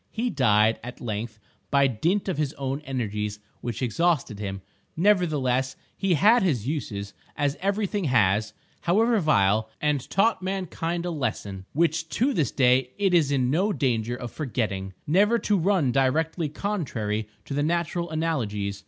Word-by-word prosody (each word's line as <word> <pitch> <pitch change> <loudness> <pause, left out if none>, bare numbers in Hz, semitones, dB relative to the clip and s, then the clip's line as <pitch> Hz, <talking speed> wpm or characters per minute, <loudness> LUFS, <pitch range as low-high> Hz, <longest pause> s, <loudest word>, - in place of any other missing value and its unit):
He 235 +2 -2
died, 110 -3 +3
at 125 +1 -8
length, 110 -1 -4 0.3
by 140 -1 +4
dint 165 - 0
of 180 -6 -2
his 150 -1 -1
own 135 +1 -3
energies, 105 -5 -3 0.2
which 120 +2 -4
exhausted 130 -4 0
him. 95 -2 -5 0.3
Nevertheless, 150 -9 +2 0.2
he 195 -3 +1
had 220 - +5
his 135 - 0
uses, 105 -9 -4 0.2
as 145 -1 +1
every 200 +2 0
thing 200 -1 -2
has, 110 -5 +2 0.3
however 220 +6 +3
vile, 110 - +2
and 150 -3 -1
taught 220 +2 +2
mankind 175 -2 -3
a 175 - -2
lesson 100 - -3
which 160 +1 +1
to 270 +4 +2
this 150 - +1
day 125 -1 +3
it 195 -2 +1
is 155 -5 +4
in 130 -2 +1
no 190 +8 +2
danger 120 - 0
of 125 -1 -7
forgetting—never 130 - 0
to 210 -2 +1
run 180 -7 +2
directly 155 +5 +1
contrary 120 - -3 0.2
to - - -6
the 145 - 0
natural 170 +2 -1
analogies. 110 -12 -2
140 Hz, 155 wpm, -25 LUFS, 115-175 Hz, 0.3 s, had